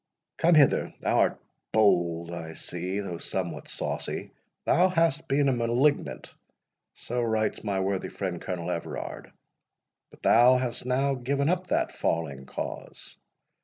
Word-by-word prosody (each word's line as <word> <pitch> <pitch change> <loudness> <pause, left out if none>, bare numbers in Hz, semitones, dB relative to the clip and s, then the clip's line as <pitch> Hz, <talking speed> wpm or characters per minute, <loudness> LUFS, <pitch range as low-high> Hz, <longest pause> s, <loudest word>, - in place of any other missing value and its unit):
Come 170 0 +4
hither—thou 145 -3 +3
art - - +2 0.3
bold, 85 -6 +2
I 80 -2 -6
see, 90 +3 -4
though 90 -4 -5
somewhat - - -4
saucy. - - -3 0.3
Thou 185 +2 +4
hast 165 -4 +1
been 140 +1 +2
a - - +4
malignant—so 120 - -2
writes 110 -2 0
my 100 -3 -1
worthy 95 0 -1
friend 90 -3 -4
Colonel 90 -1 -3
Everard; 85 -1 -5 0.8
but - - -20
thou 125 +2 +6
hast 125 -1 -3
now 135 +2 +2
given 140 +3 0
up 180 +1 0
that - - +1
falling 70 -5 -2
cause. - - -7
115 Hz, 130 wpm, -27 LUFS, 90-140 Hz, 0.8 s, thou